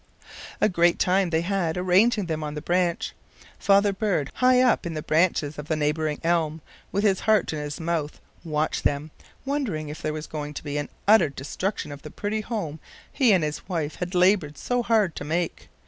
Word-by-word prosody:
A - - +4
great 175 -3 +3
time 185 0 +2
they 160 -1 +1
had 180 -2 -1
arranging 190 +4 +3
them 160 -2 -3
on 150 0 -4
the 150 - -4
branch. 175 -1 0 0.5
Father 200 0 +4
bird, 190 -8 -1
high 255 0 +4
up 250 -2 +3
in 170 -2 -4
the 155 - -4
branches 155 -3 +1
of 150 - -7
the 155 - 0
neighboring 150 0 -1
elm, 165 -2 +1 0.3
with 200 +2 0
his 195 -3 +3
heart 215 -6 +2
in 155 - -3
his 145 0 -5
mouth, 160 -3 -2 0.2
watched 155 -2 -1
them, 145 +2 -1 0.3
wondering 235 - -2
if 150 - -7
there 155 - -1
was 155 0 -5
to 150 -1 -6
be 145 -1 -2
an 145 - -4 0.2
utter 215 -7 +6
destruction 145 +6 -4
of 145 0 -9
the 150 - -9
pretty 210 +6 -3
home 200 -9 -4 0.3
he 255 -5 +4
and 185 -5 +4
his 150 +5 -4
wife 160 -4 -2
had 180 +1 -4
labored 180 -5 +3
so 245 0 0
hard 215 -7 +2
to - - -4
make. 165 +3 -2
170 Hz, 195 wpm, -25 LUFS, 150-200 Hz, 0.5 s, utter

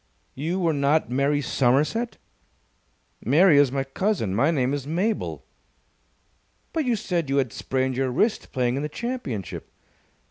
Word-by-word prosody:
"You 165 +7 -2
were 170 -3 +2
not 145 0 +1
Mary 140 +3 +1
Somerset?" 145 - +1 1.1
"Mary 150 - +5
is 140 -3 +4
my 135 0 -1
cousin. 135 - -1
My 135 +9 +3
name 135 -5 +1
is 140 -1 -3
Mabel." 190 +8 -2 1.3
"But 320 -3 0
you 245 -2 +2
said 175 -7 -2
you 135 - +1
had 130 -4 0
sprained 130 -1 -1
your 130 0 0
wrist 210 - 0
playing 125 0 0
in - - -2
the 150 - -3
championship." 235 - -5
145 Hz, 145 wpm, -24 LUFS, 130-180 Hz, 1.3 s, Mary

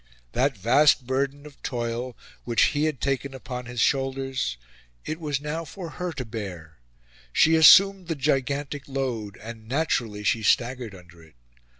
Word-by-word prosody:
That 130 -1 +1
vast 125 +6 +4
burden 135 +3 -2
of 145 -2 -14
toil 120 0 -4 0.3
which 115 -2 +2
he 145 +1 +1
had 155 -5 -2
taken 135 0 -2
upon 125 -1 -7
his 125 -1 -6
shoulders 135 - 0 0.5
it 155 - -4
was 145 -4 -2
now 150 +3 -4
for 170 +2 -8
her 180 +2 -4
to 130 -3 -5
bear. 90 - -8 0.5
She 160 - +4
assumed 190 +3 +7
the 165 - -2
gigantic 140 0 -1
load; 125 -7 -3
and 110 0 -10
naturally 120 -7 -1
she 110 +2 +1
staggered 120 -1 0
under 90 -2 -16
it. 80 -4 -19
130 Hz, 155 wpm, -25 LUFS, 115-145 Hz, 0.5 s, assumed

